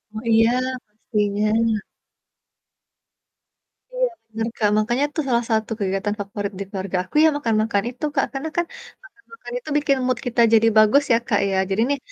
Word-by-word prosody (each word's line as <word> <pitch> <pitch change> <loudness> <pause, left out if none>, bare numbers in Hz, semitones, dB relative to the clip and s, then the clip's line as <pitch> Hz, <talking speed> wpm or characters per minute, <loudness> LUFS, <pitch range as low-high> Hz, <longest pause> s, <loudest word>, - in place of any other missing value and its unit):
Oh, - - -3
iya, 225 +2 +4 0.3
pastinya. 215 +1 0 2.1
Iya, - - +1 0.2
bener, 225 +1 -3
Kak. 210 -2 +2
Makanya 240 +6 +1
itu 300 - -6
salah 235 -1 +2
satu 220 0 0
kegiatan 195 +1 -1
favorit 200 0 -4
di - - -2
keluarga 190 -1 -3
aku 185 - -21
ya 320 - +7
makan-makan 220 -5 0
itu, 250 +4 -5
Kak. - - +2
Karena 275 +4 -4
kan 345 - +2 0.5
makan-makan 460 +4 -12
itu 480 - -11
bikin 285 -1 +2
mood 255 -2 0
kita 240 0 +1
jadi 225 0 +5
bagus 215 +7 +6
ya - - +5
Kak, 205 - +2
ya. 195 - -1
Jadi 195 +3 0
nih 285 - +1
225 Hz, 165 wpm, -22 LUFS, 210-255 Hz, 2.1 s, ya